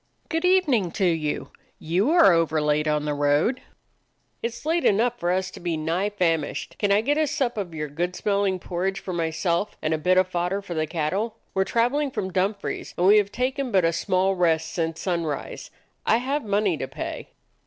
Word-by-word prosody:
"Good 325 Hz, +2 st, -1 dB
evening 295 Hz, -, +3 dB
to 195 Hz, -, 0 dB
you. 160 Hz, -4 st, -1 dB, 0.3 s
You 180 Hz, -, 0 dB
are 330 Hz, -, +6 dB
over 165 Hz, -2 st, +2 dB
late 150 Hz, 0 st, +1 dB
on 150 Hz, -1 st, 0 dB
the 150 Hz, -, -1 dB
road." 145 Hz, -, +1 dB, 0.8 s
"It 235 Hz, -, -1 dB
's 235 Hz, -, -12 dB
late 330 Hz, +2 st, +1 dB
enough 235 Hz, +4 st, +2 dB
for 175 Hz, -, -1 dB
us 185 Hz, +1 st, -1 dB
to -, -, -10 dB
be 170 Hz, -2 st, -2 dB
nigh 170 Hz, +6 st, -1 dB
famished. 165 Hz, -7 st, -1 dB
Could 205 Hz, -1 st, +1 dB
I 200 Hz, +1 st, +4 dB
get 290 Hz, +6 st, +1 dB
a 310 Hz, -, +2 dB
sup 270 Hz, -4 st, -1 dB
o' 200 Hz, -4 st, -3 dB
your 150 Hz, -1 st, -4 dB
good 175 Hz, +5 st, -3 dB
smelling 200 Hz, -2 st, 0 dB
por 175 Hz, -1 st, -5 dB
ridge 195 Hz, +1 st, 0 dB
for 185 Hz, -, -6 dB
myself, 170 Hz, +3 st, -1 dB
and 155 Hz, -, -1 dB
a 155 Hz, -, -1 dB
bit 185 Hz, +4 st, +2 dB
of 185 Hz, 0 st, +4 dB
fodder 180 Hz, +2 st, -2 dB
for 180 Hz, -, -6 dB
the 155 Hz, -1 st, -1 dB
cattle? 190 Hz, +9 st, -2 dB, 0.2 s
We 190 Hz, -, +1 dB
're -, -, +2 dB
traveling 255 Hz, +7 st, +1 dB
from 190 Hz, -7 st, -4 dB
Dumfries, 200 Hz, +2 st, -2 dB
and 175 Hz, -, +2 dB
we 205 Hz, +3 st, +7 dB
have 205 Hz, -1 st, +2 dB
taken 255 Hz, +2 st, -2 dB
but 190 Hz, -4 st, +3 dB
a 165 Hz, -, +2 dB
small 185 Hz, +3 st, +1 dB
rest 160 Hz, -3 st, +1 dB
since 165 Hz, -1 st, -2 dB
sunrise. 170 Hz, -6 st, -3 dB, 0.3 s
I 225 Hz, -, +3 dB
have 275 Hz, +4 st, -2 dB
money 200 Hz, -4 st, +1 dB
to 130 Hz, -, -4 dB
pay." -, -, -6 dB
185 Hz, 210 wpm, -24 LUFS, 165-220 Hz, 0.8 s, we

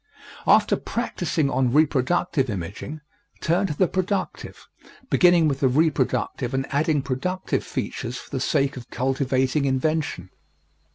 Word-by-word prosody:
After -, -, +5 dB
practising 175 Hz, -, -2 dB
on 130 Hz, -3 st, +1 dB
reproductive 150 Hz, 0 st, +2 dB
imaging, 100 Hz, -, -5 dB, 0.4 s
turn 175 Hz, +5 st, +1 dB
to 150 Hz, -, -4 dB
the 185 Hz, -, +4 dB
productive, 190 Hz, +3 st, -3 dB, 0.4 s
beginning 175 Hz, -3 st, +5 dB
with 140 Hz, -2 st, -1 dB
the 135 Hz, -, +3 dB
reproductive 135 Hz, -3 st, 0 dB
and 135 Hz, 0 st, 0 dB
adding 150 Hz, 0 st, +1 dB
productive 180 Hz, +8 st, -2 dB
features 120 Hz, +2 st, -4 dB
for -, -, -12 dB
the 135 Hz, -, -2 dB
sake 140 Hz, +1 st, +1 dB
of 120 Hz, -, -10 dB
cultivating 130 Hz, +1 st, 0 dB
invention. 135 Hz, -, -1 dB
140 Hz, 125 wpm, -24 LUFS, 130-160 Hz, 0.4 s, After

